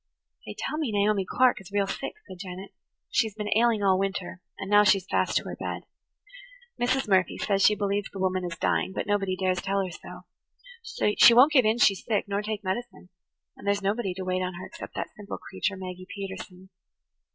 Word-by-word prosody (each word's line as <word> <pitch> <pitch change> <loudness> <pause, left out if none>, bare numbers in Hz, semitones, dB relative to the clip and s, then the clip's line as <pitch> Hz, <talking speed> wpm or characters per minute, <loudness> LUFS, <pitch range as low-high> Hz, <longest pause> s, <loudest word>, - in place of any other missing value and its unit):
"They - - -6
tell 305 - -3
me 290 -8 -1
Naomi 205 -2 +1
Clark 250 -5 +3
is 195 - -14
real 200 -1 +1
sick," - - -4
said 185 -2 -10
Janet. 185 0 -8 0.4
"She 225 - +3
has 210 - -10
been 210 -1 -1
ailing 225 -2 +3
all 190 -1 +4
winter, 195 -2 -3 0.2
and 190 - -6
now 205 +1 +6
she's 195 -2 +3
fast - - +1
to - - -1
her - - -6
bed. - - -5 1.0
Mrs. 255 +1 +1
Murphy 190 -2 +2
says 195 -2 0
she 210 - +5
believes 200 0 -1
the - - -10
woman 185 -1 0
is 175 -1 -5
dying, 190 - 0
but - - -3
nobody 195 -2 0
dares 185 -1 0
tell 195 0 0
her 185 - -6
so. 460 - -6
She 235 - +9
won't 265 +6 +7
give 260 -6 +5
in 220 +2 +3
she's 200 -5 +3
sick, 215 -3 -1
nor 200 0 -1
take 210 0 -4
medicine. 190 -1 -4 0.5
And - - -11
there's 200 0 +1
nobody 200 -2 -1
to 190 0 -5
wait 185 0 0
on 185 -1 -3
her 185 - -7
except 335 - -10
that - - -4
simple 210 -2 -7
creature, 190 +1 -3
Maggie 185 -1 -8
Peterson." 190 -1 -8
200 Hz, 210 wpm, -27 LUFS, 185-215 Hz, 1.0 s, She